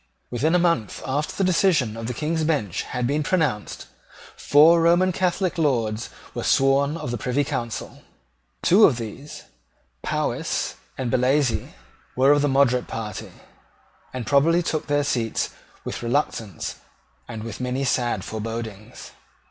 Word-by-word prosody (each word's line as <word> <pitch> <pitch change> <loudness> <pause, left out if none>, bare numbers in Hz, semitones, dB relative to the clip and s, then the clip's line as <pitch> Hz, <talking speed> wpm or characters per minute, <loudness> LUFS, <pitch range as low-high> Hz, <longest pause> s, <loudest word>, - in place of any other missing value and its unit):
Within 150 +8 +1
a - - +6
month 170 - 0
after 145 +3 -2
the 195 - 0
decision 165 - +2
of 115 0 -5
the 125 - -4
King's 160 +5 -1
Bench 140 - 0
had 125 -1 -3
been 145 +5 0
pronounced, 150 - -1 0.5
four 160 +4 +5
Roman 175 +3 +4
Catholic 185 0 -1
Lords 120 -7 0 0.2
were - - -4
sworn 140 +3 +3
of 125 - -5
the 120 - -3
Privy 125 +6 0
Council. 120 -4 -5 0.6
Two 205 +5 +6
of 130 - +3
these, 120 +6 -8 0.6
Powis - - -2 0.2
and 125 -3 -2
Bellasyse, 130 0 +1 0.4
were 135 +2 +5
of 145 0 +4
the 145 - +2
moderate 130 -2 +2
party, 105 -3 -6 0.8
and 125 -2 -5
probably 165 +5 +3
took 155 -2 -2
their 145 0 +2
seats 120 -5 -1 0.3
with - - -5
reluctance 115 - -2 0.5
and 110 -2 -7
with 115 0 -7
many 125 +2 -1
sad 120 -6 0
forebodings. 110 0 -6
135 Hz, 140 wpm, -23 LUFS, 115-155 Hz, 0.8 s, a